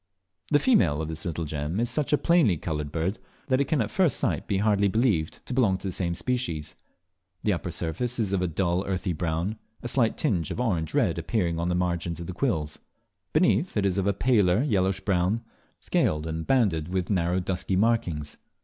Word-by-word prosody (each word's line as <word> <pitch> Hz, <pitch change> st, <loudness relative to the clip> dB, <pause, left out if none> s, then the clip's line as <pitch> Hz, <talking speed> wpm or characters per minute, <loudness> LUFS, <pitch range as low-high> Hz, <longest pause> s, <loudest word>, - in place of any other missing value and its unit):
The 145 Hz, -, +5 dB
female 90 Hz, -, +3 dB
of 80 Hz, 0 st, -3 dB
this 80 Hz, 0 st, -5 dB
little 85 Hz, -1 st, -2 dB
gem 75 Hz, +5 st, -3 dB
is 120 Hz, -, +1 dB
such 130 Hz, +4 st, -1 dB
a 150 Hz, -, +5 dB
plainly 160 Hz, -, +3 dB
coloured 75 Hz, -2 st, -4 dB
bird, 85 Hz, +6 st, -2 dB, 0.3 s
that 130 Hz, +1 st, +3 dB
it -, -, +2 dB
can 140 Hz, -1 st, +1 dB
at 110 Hz, -, -2 dB
first 185 Hz, -6 st, +2 dB
sight -, -, -1 dB
hardly 100 Hz, -1 st, +3 dB
be 100 Hz, +3 st, 0 dB
believed 95 Hz, -11 st, 0 dB
to -, -, -5 dB
belong 110 Hz, -7 st, +3 dB
to 100 Hz, -, -6 dB
the -, -, -2 dB
same 85 Hz, -1 st, -1 dB
species. 85 Hz, -, -2 dB, 0.7 s
The 105 Hz, -, +2 dB
upper 90 Hz, 0 st, -3 dB
surface 85 Hz, +10 st, -2 dB
is 105 Hz, -4 st, 0 dB
of 95 Hz, -, +1 dB
a 90 Hz, -, +1 dB
dull 85 Hz, +2 st, 0 dB
earthy 95 Hz, -1 st, -1 dB
brown, 85 Hz, +6 st, -2 dB, 0.2 s
a -, -, -3 dB
slight 120 Hz, -2 st, +1 dB
tinge 95 Hz, -, 0 dB
of -, -, -4 dB
orange 90 Hz, -11 st, -1 dB
red -, -, +2 dB
appearing 85 Hz, -7 st, -1 dB
only -, -, -1 dB
on 85 Hz, -, 0 dB
the 90 Hz, -, +1 dB
margins 85 Hz, -2 st, -1 dB
of 85 Hz, -, -5 dB
the 90 Hz, -, -5 dB
quills. 85 Hz, -, -1 dB, 0.5 s
Beneath, 125 Hz, -, +2 dB
it 100 Hz, -, +2 dB
is 100 Hz, 0 st, +1 dB
of 95 Hz, -, 0 dB
a -, -, +4 dB
paler 105 Hz, -2 st, +3 dB
yellowish 95 Hz, -7 st, +1 dB
brown, 100 Hz, +4 st, +1 dB, 0.4 s
scaled 75 Hz, 0 st, +1 dB
and 80 Hz, 0 st, -4 dB
banded 100 Hz, -12 st, +2 dB
with 90 Hz, +1 st, -2 dB
narrow 90 Hz, -1 st, +1 dB
dusky 95 Hz, +1 st, -1 dB
markings. 90 Hz, -9 st, 0 dB
95 Hz, 210 wpm, -26 LUFS, 85-115 Hz, 0.7 s, The